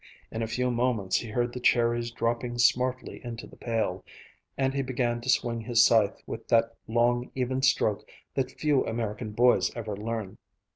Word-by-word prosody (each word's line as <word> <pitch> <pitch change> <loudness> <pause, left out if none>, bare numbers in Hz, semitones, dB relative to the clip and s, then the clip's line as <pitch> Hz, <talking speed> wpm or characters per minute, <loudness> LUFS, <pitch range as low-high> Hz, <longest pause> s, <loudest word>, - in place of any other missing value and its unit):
In 110 - -4
a 115 - -1
few 125 +3 0
moments 120 -5 +1
he 115 - -4
heard 120 +2 -1
the 125 - -5
cherries 120 -1 +2
dropping 120 +1 -2
smartly 125 +1 +1
into 120 -1 -6
the - - -15
pail, 115 -2 -2 0.5
and 135 0 +1
he 140 - 0
began 120 -2 -1
to 125 - -6
swing 115 -2 +1
his 115 0 +4
scythe 110 -3 +3
with 115 - -7
that 115 0 +3
long, 120 +2 +1
even 130 0 -1
stroke 120 -5 +2 0.3
that 130 -1 -1
few 150 -2 +3
American 110 -1 -3
boys 120 +3 +3
ever 110 -3 -4
learn. 110 -1 -5
120 Hz, 175 wpm, -28 LUFS, 115-125 Hz, 0.5 s, his